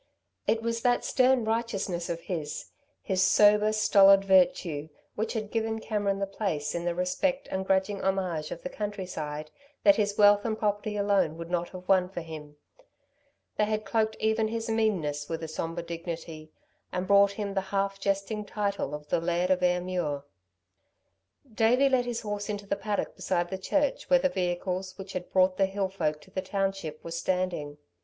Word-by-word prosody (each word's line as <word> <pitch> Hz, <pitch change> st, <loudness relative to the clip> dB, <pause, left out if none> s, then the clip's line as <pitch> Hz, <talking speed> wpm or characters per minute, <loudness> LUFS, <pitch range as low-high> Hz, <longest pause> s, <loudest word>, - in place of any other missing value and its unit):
It 225 Hz, 0 st, +1 dB
was 230 Hz, 0 st, -1 dB
that 245 Hz, 0 st, +2 dB
stern 255 Hz, -2 st, +3 dB
righteousness 205 Hz, -6 st, -2 dB
of 170 Hz, 0 st, -3 dB
his, 155 Hz, -5 st, -5 dB, 0.3 s
his 190 Hz, -2 st, 0 dB
sober, 210 Hz, +2 st, +5 dB
stolid 195 Hz, -2 st, +6 dB
virtue, 175 Hz, -5 st, +3 dB, 0.2 s
which 220 Hz, +2 st, -2 dB
had 215 Hz, -3 st, -4 dB
given 225 Hz, -1 st, -1 dB
Cameron 205 Hz, -3 st, -1 dB
the 195 Hz, -, -1 dB
place 190 Hz, -7 st, -2 dB
in 170 Hz, 0 st, -3 dB
the 175 Hz, -1 st, 0 dB
respect 265 Hz, +10 st, 0 dB
and 190 Hz, 0 st, -1 dB
grudging 195 Hz, +1 st, +1 dB
homage 185 Hz, -5 st, -1 dB
of 170 Hz, -, -7 dB
the -, -, -4 dB
countryside 180 Hz, -8 st, -5 dB, 0.3 s
that 300 Hz, -, +6 dB
his 205 Hz, -1 st, 0 dB
wealth 205 Hz, 0 st, +6 dB
and 220 Hz, -2 st, -1 dB
property 210 Hz, 0 st, -1 dB
alone 200 Hz, -6 st, +2 dB
would 170 Hz, +1 st, -7 dB
not 175 Hz, -1 st, -1 dB
have 185 Hz, -1 st, -10 dB
won 185 Hz, -2 st, +4 dB
for 180 Hz, -2 st, -5 dB
him; 155 Hz, -2 st, -9 dB, 1.0 s
they 210 Hz, -, +3 dB
had 215 Hz, 0 st, -2 dB
cloaked 220 Hz, -1 st, 0 dB
even 220 Hz, 0 st, +1 dB
his 225 Hz, 0 st, -3 dB
meanness 170 Hz, -10 st, 0 dB
with 165 Hz, 0 st, -3 dB
a -, -, -3 dB
sombre 165 Hz, +2 st, -4 dB
dignity 165 Hz, -2 st, -7 dB, 0.4 s
and 180 Hz, 0 st, -2 dB
brought 200 Hz, +1 st, +5 dB
him 200 Hz, -1 st, -4 dB
the 195 Hz, -, +1 dB
half 195 Hz, 0 st, -1 dB
jesting 200 Hz, +2 st, -1 dB
title 200 Hz, -5 st, -2 dB
of 150 Hz, 0 st, -10 dB
the -, -, +1 dB
Laird 175 Hz, +2 st, 0 dB
of 185 Hz, -1 st, +2 dB
Ayrmuir. 180 Hz, -5 st, 0 dB, 1.3 s
Davey 245 Hz, +5 st, +4 dB
led 255 Hz, -2 st, +2 dB
his 235 Hz, -1 st, -2 dB
horse 205 Hz, -1 st, -4 dB
into 205 Hz, -1 st, -4 dB
the -, -, -1 dB
paddock 205 Hz, +1 st, -3 dB
beside 175 Hz, -1 st, -1 dB
the 190 Hz, -, -2 dB
church 285 Hz, +8 st, 0 dB
where 270 Hz, -, +7 dB
the 275 Hz, +1 st, +1 dB
vehicles 185 Hz, -1 st, -2 dB
which 195 Hz, -1 st, -8 dB
had 180 Hz, -1 st, -5 dB
brought 185 Hz, 0 st, +3 dB
the 195 Hz, -, +3 dB
hill 195 Hz, 0 st, -2 dB
folk 155 Hz, -5 st, -1 dB
to 190 Hz, -, -18 dB
the 190 Hz, -, -2 dB
township 195 Hz, -6 st, -3 dB
were 165 Hz, -, -7 dB
standing. 170 Hz, -4 st, -2 dB
195 Hz, 180 wpm, -28 LUFS, 175-210 Hz, 1.3 s, where